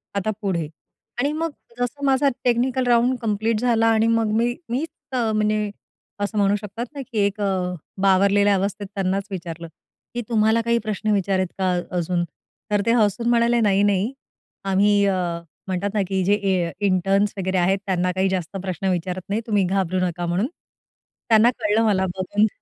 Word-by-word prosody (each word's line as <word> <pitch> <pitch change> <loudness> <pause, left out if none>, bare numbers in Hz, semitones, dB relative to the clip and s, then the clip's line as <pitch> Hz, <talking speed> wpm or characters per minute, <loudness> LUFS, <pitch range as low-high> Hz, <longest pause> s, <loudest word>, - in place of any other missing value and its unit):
आता 200 +2 0
पुढे 175 -6 -1 0.5
आणि 280 +3 +1
मग 325 +1 -2 0.3
जसं 280 +4 -2
माझा 270 +1 +3
टेक्निकल 250 +1 +1
राउंड 245 +2 +3
कंप्लीट 220 0 0
झाला 230 -2 +2
आणि 225 0 +3
मग 230 -2 +2
मी 240 +1 +1
मीच 270 +7 -1 0.2
अ, 235 -4 0
म्हणजे 215 0 +1 0.5
असं 205 +1 -2
म्हणू 200 0 +3
शकतात 210 +3 -5
ना 280 - -4
की 225 - -4
एक 200 +1 -2
अ, 185 -2 0 0.3
बावरलेल्या 200 +1 +4
अवस्थेत 200 +1 -2
त्यांनाच 195 0 0
विचारलं, 170 -2 -6 0.5
की 240 - -2
तुम्हाला 220 0 +3
काही 235 +1 +1
प्रश्न 215 0 -1
विचार 195 -1 +1
आहेत 185 - +1
का 185 -1 +1 0.3
अजून? 175 0 0 0.5
तर 205 -1 +3
ते 230 - +3
हसून 215 +3 +1
म्हणाले, 235 0 +3
"नाही, 200 -2 +3
नाही. 205 +4 +1 0.6
आम्ही 205 +2 +4
अ, 195 -1 +2 0.5
म्हणतात 190 +1 -1
ना 210 - +1
की 190 0 0
जे 200 - +4
ए 190 -4 0
इंटर्न्स 195 +2 +2
वगैरे 190 0 -1
आहेत 185 +2 +3
त्यांना 180 -1 0
काही 190 +1 +1
जास्त 190 0 -3
प्रश्न 190 0 -3
विचारत 180 +1 -2
नाही. 210 +3 0
तुम्ही 205 -3 +2
घाबरू 185 -1 0
नका," 175 0 -3
म्हणून. 175 +7 0 0.8
त्यांना 225 +1 +6
कळलं 210 +2 +2
मला 190 -3 +2
बघून. 205 +3 +1
205 Hz, 170 wpm, -22 LUFS, 190-225 Hz, 0.8 s, त्यांना